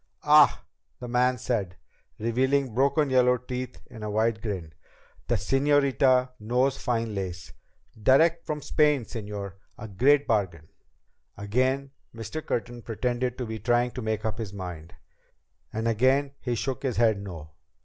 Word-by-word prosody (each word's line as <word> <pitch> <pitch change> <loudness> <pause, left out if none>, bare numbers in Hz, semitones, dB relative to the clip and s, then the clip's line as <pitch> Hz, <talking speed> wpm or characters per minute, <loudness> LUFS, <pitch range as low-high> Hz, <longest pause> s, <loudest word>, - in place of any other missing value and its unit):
"Ah," - - +5 0.3
the 125 - -7
man 125 +1 +2
said, 105 -7 -2 0.4
revealing 130 +3 +1
broken 140 +3 +2
yellow 125 -1 +4
teeth 125 +1 -6
in 120 -4 -12
a 105 - -4
wide 110 +1 0
grin. 95 -8 -5 0.5
"The 120 - +1
señorita 135 +2 +2
knows 125 +5 +1
fine 115 -2 -1
lace. 90 -3 -5 0.5
Direct 160 +8 +4
from 150 -1 -4
Spain, 150 -5 +2
señor! 105 -4 -6 0.2
A 110 - -7
great 135 +8 +3
bargain." 90 -8 -1 0.7
Again 130 +7 0 0.2
Mr. 115 +8 -6
Curtin 120 0 -3
pretended 120 +2 -2
to 125 - -3
be 110 -1 -5
trying 120 +3 +1
to 125 - -6
make 110 -1 -2
up 110 +1 -3
his 105 -4 -5
mind. 90 -4 -8 0.8
And 110 +1 -2
again 130 +5 +2
he 125 -2 -2
shook 130 +3 -3
his 130 -5 -2
head 110 -3 +3
no. 80 -6 -9
120 Hz, 145 wpm, -26 LUFS, 105-130 Hz, 0.8 s, Ah